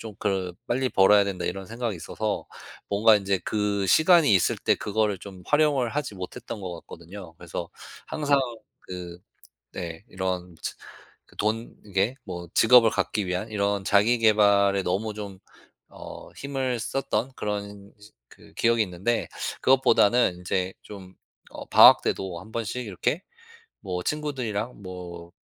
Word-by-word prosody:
좀 110 -2 -8
그 95 -3 -1 0.2
'빨리 130 +2 +1
벌어야 100 -1 +5
된다.' 100 -2 -4
이런 95 +2 -4
생각이 115 0 -3
있어서 110 +5 -3 0.4
뭔가 110 +2 +5
인제 100 -1 0
그 105 -2 -1
시간이 160 - +5
있을 95 - +2
때 - - +2
그거를 105 -2 -1
좀 95 -2 -11
활용을 150 -4 +2
하지 145 -6 -3
못했던 95 +3 -7
것 95 -2 -5
같거든요. 85 0 -11
그래서 85 0 -6 0.4
항상 145 -2 +1 0.4
그 90 -1 -8 0.6
네 85 0 -6
이런 90 -1 -3
츠 - - -4 0.6
돈 110 +2 -2
이게 100 +4 0
뭐 85 -3 -7
직업을 115 0 +6
갖기 105 -1 -1
위한 90 +5 -3
이런 100 -1 -1
자기 105 +5 +4
계발에 100 -3 +4
너무 100 +5 -1
좀 100 -3 -8 0.5
어 - - -10
힘을 135 -3 -2
썼던 130 0 -2
그런 100 -1 -5
즈 105 +1 -16 0.2
그 - - -19
기억이 115 -1 +2
있는데 95 +5 -2 0.3
그것보다는 125 -5 +4
인제 90 +1 -2
좀 95 -3 -11 0.4
어 - - -8
방학 - - +8
때도 90 -3 -3
한 110 +6 -13
번씩 115 +2 -3
이렇게 125 - -2 0.6
뭐 90 -3 -4
친구들이랑 125 -7 -3
뭐 90 -2 -9
100 Hz, 275 characters per minute, -25 LUFS, 95-115 Hz, 0.6 s, 방학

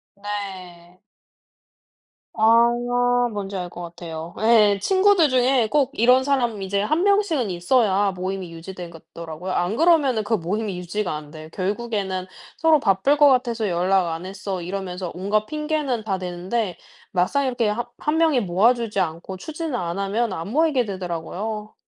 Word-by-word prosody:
네. 185 -4 -7 1.3
아 230 +2 +5 0.6
뭔지 200 -1 -5
알 180 -2 -4
거 175 - -9
같아요. 170 -1 -8
예. 215 -3 +5
친구들 375 - +4
중에 255 -2 +3
꼭 290 -3 +2
이런 250 +3 +4
사람 245 -6 0
이제 200 +1 -1
1 310 - +1
명씩은 400 - +2
있어야 200 +2 +2
모임이 185 -1 -5
유지되겠더라고요. 170 -1 -8
안 180 +3 0
그러면은 295 -7 +3
그 225 - -2
모임이 195 +2 -3
유지가 180 0 -3
안 150 -1 -9
돼. 155 0 -10
결국에는 195 -2 -2 0.3
서로 320 -2 +4
"바쁠 230 +8 +2
것 290 - +7
같아서 240 -5 +1
연락 180 +1 +2
안 165 +2 -4
했어." 190 -1 -5
이러면서 180 -1 -5
온갖 205 +4 0
핑계는 300 -6 -2
다 200 -3 -1
대는데 180 +2 -3 0.3
막상 195 +10 +1
이렇게 245 -4 0
하 235 +3 -2
1 300 +1 0
명이 320 -6 +3
모아 200 +5 +3
주지 230 -4 -3
않고 175 +2 -3
추진을 315 - -5
안 175 -5 -3
하면 210 +3 0
안 165 +1 -5
모이게 290 -1 +2
되더라고요. 195 +3 -5
205 Hz, 305 characters per minute, -23 LUFS, 180-245 Hz, 1.3 s, 것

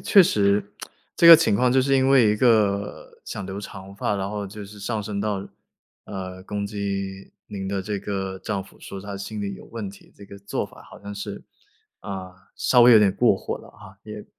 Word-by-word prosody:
确 200 -3 +6
实 100 - +2 0.5
这 170 - +5
个 165 -1 +13
情 100 - +2
况 125 +4 +3
就 130 - +4
是 135 +1 +2
因 130 0 +3
为 125 -6 +6
一 105 - +1
个 105 -4 +1
想 100 - -6
留 95 +2 -6
长 95 -1 -10
发， 100 0 -1
然 95 0 -2
后 105 -1 -4
就 105 +1 -9
是 105 +1 -12
上 110 +1 -2
升 100 -1 -4
到， 100 -2 -2 0.6
呃， 95 -2 -7
攻 100 0 -3
击 100 -1 -4 0.2
您 95 -2 -5
的 100 -1 -2
这 105 +1 -3
个 95 -1 -4
丈 95 0 -3
夫 - - -19
说 100 - -8
他 100 +1 -7
心 105 +1 -6
理 100 -1 -3
有 - - -12
问 110 -4 -6
题， 100 - -17
这 100 - -12
个 100 0 -12
做 100 +1 -3
法 - - -14
好 - - -13
像 100 0 -7
是， 100 0 -7 0.6
啊， 95 -2 -6 0.2
稍 125 - +4
微 120 0 +8
有 110 - +9
点 100 -2 +4
过 - - +4
火 - - -5
了 - - -15
啊。 100 -1 -15
也 105 -1 -8
100 Hz, 235 characters per minute, -24 LUFS, 100-105 Hz, 0.6 s, 个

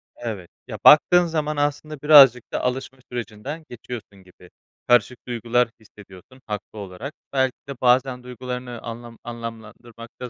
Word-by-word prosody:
Evet, 105 -7 -6 0.2
ya, - - -6
baktığın 175 +4 +7
zaman 155 -2 -2
aslında 145 +1 -2
birazcık 135 -6 +8
da - - -2
alışma 130 +1 -3
sürecinden 120 +7 -6
geçiyorsun 110 -5 -9
gibi. 90 -1 -19 0.4
Karışık 120 +1 +3
duygular 120 0 +1
hissediyorsun 105 +3 -16
haklı 105 0 -6
olarak. 100 +9 -7 0.2
Belki 130 -2 +1
de - - -3
bazen 125 0 +2
duygularını 125 -1 -7
anlam 115 0 -9
anlamlandırmakta 115 +1 -9
125 Hz, 130 wpm, -23 LUFS, 115-130 Hz, 0.4 s, birazcık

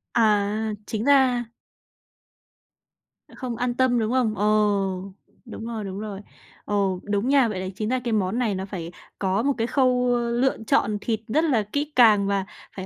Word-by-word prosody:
À, 210 -3 +3 0.4
chính 220 +1 -3
ra 260 -4 +4 1.9
Không 250 -3 -5
an 245 0 -1
tâm, 250 -1 +2
đúng 220 0 -1
không? 245 -4 +1
Ừ, 205 - -2 1.0
đúng 225 -1 -8
rồi, 230 -2 -4
đúng 195 0 -6
rồi. 205 -2 -6 0.4
Ừ, - - -4 0.3
đúng 205 +4 -1
nha. 275 -3 +4
Vậy 210 -4 -4
là 185 - -4
chính 215 +1 -3
ra 255 +1 +1
cái 240 -2 -3
món 205 +2 0
này 225 -5 0
nó 190 0 -4
phải 175 -4 -6 0.3
có 195 +2 0
một 280 +1 +2
cái 230 0 0
khâu 250 -2 +2
lựa 240 +2 0
chọn 210 0 +2
thịt 220 -1 -1
rất 300 +8 +1
là 260 -10 +2
kỹ 290 +1 -2
càng 215 -5 +5
và 200 -1 0 0.3
phải 190 -1 -6
225 Hz, 175 wpm, -24 LUFS, 205-250 Hz, 1.9 s, càng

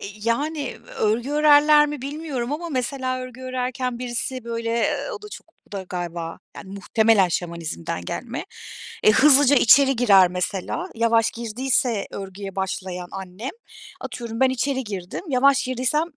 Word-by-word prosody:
Eee, - - -6
iii, 210 +1 -13
yani 290 +3 -1 0.2
örgü 225 +5 0
örerler 295 0 +6
mi 295 -3 -6
bilmiyorum 280 -3 -4
ama 340 +3 -4
mesela 255 -1 -2
örgü 255 0 -8
örerken 255 -1 -3
birisi 250 0 -4
böyle, 230 0 -3
eee, 235 - 0
o 430 - -7
da 420 - -9
çok - - -11 0.2
o - - -24
da 195 -2 -4
galiba, 170 -2 -5 0.2
yani 190 - -10
muhtemelen 210 -1 +3
Şamanizm'den 165 - -4
gelme. - - -5 0.6
Eee, 215 - +7
hızlıca 285 +2 +6
içeri 270 +3 +6
girer 195 -6 +6
mesela 185 - -3
yavaş 230 0 +2
girdiyse 235 0 -1
örgüye 195 0 -7
başlayan 185 -2 -4
annem, 195 +6 -6 0.5
atıyorum 235 -3 -6
ben 265 - +5
içeri 260 +1 -1
girdim 195 - -6
yavaş 275 0 +3
girdiysem, 255 +5 0
240 Hz, 150 wpm, -23 LUFS, 200-270 Hz, 0.6 s, Eee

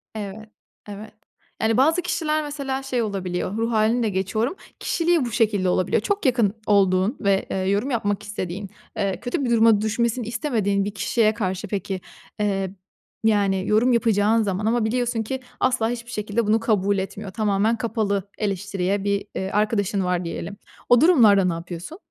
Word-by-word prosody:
Evet, 215 +1 -7 0.4
evet. 210 +2 -9 0.5
Yani 220 0 +2
bazı 320 +7 +4
kişiler 310 -3 -1
mesela 275 -2 -4
şey 255 -3 -1
olabiliyor, 195 -1 -3
ruh 230 +1 0
halini 225 +2 +2
de 220 - +1
geçiyorum, 215 - -1 0.2
kişiliği 335 -4 +1
bu 235 - -4
şekilde 210 -5 +1
olabiliyor. 185 +2 +1
Çok 405 - -2
yakın 235 -6 +3
olduğun 195 +3 +3
ve, 200 -2 +1
eee, - - -1
yorum 200 +8 0
yapmak 210 -3 -1
istediğin, 200 -1 -5 0.3
eee, 195 -2 -1
kötü 245 +5 -2
bir - - -1
duruma 225 -2 +5
düşmesini 235 +2 0
istemediğin 220 -5 0
bir 205 - -4
kişiye 215 +2 +1
karşı 195 -2 -3
peki, 195 -1 -3 0.4
eee, 195 -2 0 0.5
yani 200 -3 +2
yorum 230 +4 +3
yapacağın 225 -1 +3
zaman 200 0 -2
ama 225 0 +2
biliyorsun 240 0 0
ki 265 +4 -4 0.2
asla 230 -3 +1
hiçbir 235 0 -5
şekilde 210 0 -1
bunu 220 +1 +3
kabul 205 -3 +1
etmiyor. 195 +1 -5
Tamamen 210 +2 +1
kapalı 210 -4 -1
eleştiriye 200 -1 -1
bir, 200 0 0
eee, 190 0 -3
arkadaşın 205 -2 +1
var 180 -1 -1
diyelim. 200 +4 -5 0.3
O 245 0 +6
durumlarda 225 - +6
ne 180 - +1
yapıyorsun? 175 - -7
210 Hz, 165 wpm, -23 LUFS, 195-235 Hz, 0.5 s, O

